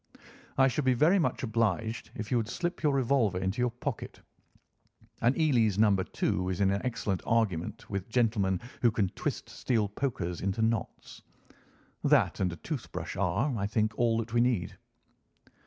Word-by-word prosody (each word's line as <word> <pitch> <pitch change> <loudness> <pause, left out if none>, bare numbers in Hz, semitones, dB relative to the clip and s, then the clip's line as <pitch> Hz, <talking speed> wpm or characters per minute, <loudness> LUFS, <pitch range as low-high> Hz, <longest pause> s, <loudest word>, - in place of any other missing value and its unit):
I 135 0 +6
should 135 +3 -1
be 130 -1 +3
very 165 +10 +4
much 160 - 0
obliged 110 -1 -1
if 105 -1 -6
you 125 - +3
would 115 -2 -1
slip 175 +7 -3
your 150 - +3
revolver 130 -7 +2
into 95 +6 -1
your 125 - +2
pocket. 120 +1 -5 1.0
An 120 +6 +2
Eley's 120 - +3
No. 105 -2 +5
2 90 -1 -1
is 90 - -2
an 95 -1 +3
excellent 100 -3 -1
argument 105 -8 -1
with 100 0 -4
gentlemen 110 -6 +1 0.2
who 120 - +5
can 105 -4 0
twist - - -4
steel 115 -5 0
pokers 100 -6 -3
into 100 +3 -1
knots. 110 -2 -2 0.8
That - - +3
and 90 -2 +1
a - - -6
tooth 140 - -6
brush - - -5
are, 100 +9 0
I 100 -2 -1
think, 110 0 0
all 115 -1 +2
that 115 0 -4
we 120 - +4
need." 120 -7 0
110 Hz, 170 wpm, -29 LUFS, 100-125 Hz, 1.0 s, I